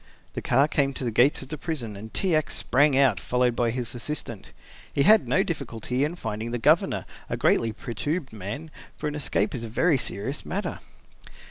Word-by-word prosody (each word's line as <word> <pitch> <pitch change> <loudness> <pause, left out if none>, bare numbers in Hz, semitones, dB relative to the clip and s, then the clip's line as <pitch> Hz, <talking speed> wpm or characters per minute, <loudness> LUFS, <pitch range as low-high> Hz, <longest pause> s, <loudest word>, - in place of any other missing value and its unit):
The - - -4
car 135 +4 +3
came 140 -3 +1
to - - -2
the 120 - -1
gates 125 +5 +3
of 130 - -12
the 155 -1 -4
prison 130 -11 -4
and 110 +3 -9
T. 190 -3 0
X. 155 -2 +1
sprang 140 +1 +3
out, 130 -8 +4
followed 125 -1 +1
by 120 -1 +1
his 120 -1 -3
assistant. 120 -4 -6 0.4
He 140 - +2
had 215 +4 +6
no 190 - +3
difficulty 125 - -2
in 155 +4 -1
finding 110 -6 -4
the 120 - -2
Governor, 115 - +2 0.2
a - - -2
greatly 115 -1 +2
perturbed 125 +7 -4
man, 110 +10 -6 0.3
for 150 - -3
an 150 - -2
escape 130 -8 0
is 120 - -4
a 115 - -5
very 135 +6 +2
serious 125 +9 -3
matter. 200 +3 -3
130 Hz, 200 wpm, -26 LUFS, 115-150 Hz, 0.4 s, had